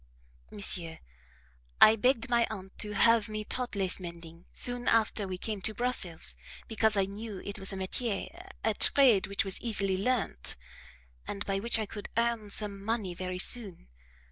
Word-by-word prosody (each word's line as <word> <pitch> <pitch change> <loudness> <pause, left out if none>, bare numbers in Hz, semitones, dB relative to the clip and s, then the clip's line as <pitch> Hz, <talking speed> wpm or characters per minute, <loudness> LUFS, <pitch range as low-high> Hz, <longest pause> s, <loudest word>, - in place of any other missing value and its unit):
"Monsieur, 170 -5 -1 0.8
I 215 - +8
begged 250 +2 +1
my 235 -1 +2
aunt 190 -3 -8
to 210 0 -4
have 230 +1 +3
me 215 0 -4
taught 250 -1 -3
lace 195 -2 0
mending 170 -1 -10
soon 245 0 -3
after 220 -2 +2
we 185 -1 -4
came 210 +1 -5
to 215 +2 0
Brussels, 180 - +1 0.3
because 220 -1 +1
I 195 - +3
knew 205 0 -7
it 200 +1 -5
was 195 - -2
a - - -5
METIER, 235 - -4
a 220 - +2
trade 230 -4 +5
which 200 0 -1
was 195 - -2
easily 195 -5 0
learnt, 230 - -1 0.7
and 200 0 -5
by 195 -1 -1
which 230 +3 +4
I 220 - -2
could 205 0 -8
earn 230 -2 0
some 200 -1 0
money 215 -4 -2
very 185 +1 -5
soon. 195 - +2
205 Hz, 170 wpm, -30 LUFS, 190-230 Hz, 0.8 s, I